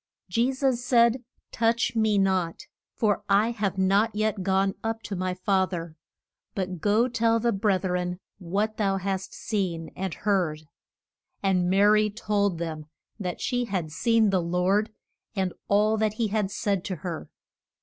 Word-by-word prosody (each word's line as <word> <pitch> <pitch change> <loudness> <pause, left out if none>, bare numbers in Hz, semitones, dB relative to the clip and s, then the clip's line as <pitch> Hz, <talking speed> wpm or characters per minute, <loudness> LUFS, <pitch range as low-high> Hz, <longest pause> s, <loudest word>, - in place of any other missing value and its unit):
Je 235 +8 +2
sus 260 -2 0
said, 240 -1 +3 0.3
Touch 230 +1 +1
me 220 -2 +2
not, 190 -4 0 0.3
for 210 -2 +1
I 205 +4 +4
have 200 -4 -2
not 200 +4 +2
yet 215 -1 0
gone 195 +1 +1
up 225 0 -3
to 200 - -4
my 185 0 -2
Fa 190 0 +1
ther; 170 -3 -5 0.6
but 185 -3 -3
go 215 +5 +3
tell 230 -2 +2
the 235 +1 +1
breth 195 -2 +1
ren 180 -1 -1 0.2
what 205 +4 -1
thou 195 -2 +1
hast 190 0 -3
seen 180 -6 -3
and 190 -3 -3
heard. 180 -7 0 0.8
And 180 -2 +2
Ma 195 +2 +4
ry 210 +1 +5
told 205 -3 0
them 160 -2 -5 0.3
that 180 -3 -4
she 245 -1 0
had 185 -8 -3
seen 225 +4 +2
the 190 -2 +2
Lord, 180 +5 +1 0.5
and 190 -2 -1
all 210 +2 +3
that 215 -1 +1
he 220 0 -1
had 210 -2 0
said 200 -2 -1
to 185 - -3
her. 170 -3 -5
200 Hz, 160 wpm, -26 LUFS, 185-220 Hz, 0.8 s, ry